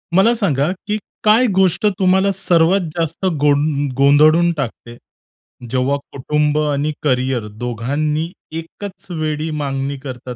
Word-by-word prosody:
मला 220 +5 +5
सांगा, 155 - +1 0.2
की 210 0 0 0.3
काय 220 +3 +5
गोष्ट 185 0 +2
तुम्हाला 190 +1 +3
सर्वात 175 +2 +2
जास्त 165 +2 -2 0.2
गों 145 0 +2
गोंधळून 155 +5 +5
टाकते. 120 -3 -5 0.7
जेव्हा 130 +3 0
कुटुंब 150 +2 0
आणि 150 0 0
करियर 130 -4 0
दोघांनी 145 +7 -2 0.3
एकच 190 +4 -10
वेळी 155 -1 -2
मागणी 135 0 -3
करतात 125 -2 -7
150 Hz, 115 wpm, -18 LUFS, 135-175 Hz, 0.7 s, मला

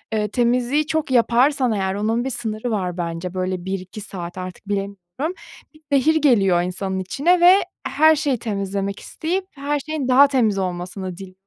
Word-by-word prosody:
ııı, 210 -1 0
temizliği 250 +6 +1
çok 310 -4 -1
yaparsan 250 +2 +3
eğer 190 -2 -1
onun 225 +3 0
bir 265 - -2
sınırı 225 -1 -4
var 185 -4 -2
bence, 170 +1 -4
böyle, 185 -1 -3
1-2 190 +2 -5
saat 180 -3 -7
artık 185 +2 -8
bilemiyorum, 200 - -4 0.4
bir 310 - -21
zehir 285 +3 +3
geliyor 200 - +3
insanın 190 +1 -3
içine 295 - +1
ve 360 +2 +8 0.3
her 310 +3 +5
şeyi 280 -3 0
temizlemek 200 -2 -3
isteyip 365 +4 -3
her 290 +1 -2
şeyin 300 -2 -4
daha 265 +2 +7
temiz 235 -7 +1
olmasını 180 0 -4
dil 190 -1 -10
215 Hz, 160 wpm, -21 LUFS, 190-275 Hz, 0.4 s, ve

